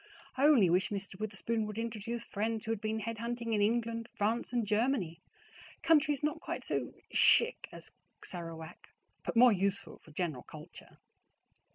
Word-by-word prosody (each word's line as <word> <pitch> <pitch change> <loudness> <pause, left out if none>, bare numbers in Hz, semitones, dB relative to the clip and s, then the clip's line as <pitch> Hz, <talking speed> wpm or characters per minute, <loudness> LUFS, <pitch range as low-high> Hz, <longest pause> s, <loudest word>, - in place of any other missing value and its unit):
I 275 +2 +4
only 250 -11 +6
wish 180 +3 +2
Mr. 195 -1 -5
Witherspoon 215 +1 -2
would 210 0 -6
introduce 230 0 -3
friends 220 +1 -2
who 225 - -1
had 225 -2 -2
been 220 0 -1
head 230 +1 -4
hunting 235 0 -3
in 210 - +2
England, 230 +1 0
France, 220 +4 0
and 240 -3 +1
Germany, 210 -5 0 0.6
countries 295 -3 +3
not 300 - -1
quite - - -4
so - - -2 0.2
CHIC 475 +2 +4
as - - -7 0.3
Sarawak, 165 -2 -7 0.3
but - - -3
more 245 +1 +8
useful 195 0 -1
for - - -18
general 155 -4 -3
culture. - - -12
220 Hz, 160 wpm, -32 LUFS, 195-235 Hz, 0.6 s, more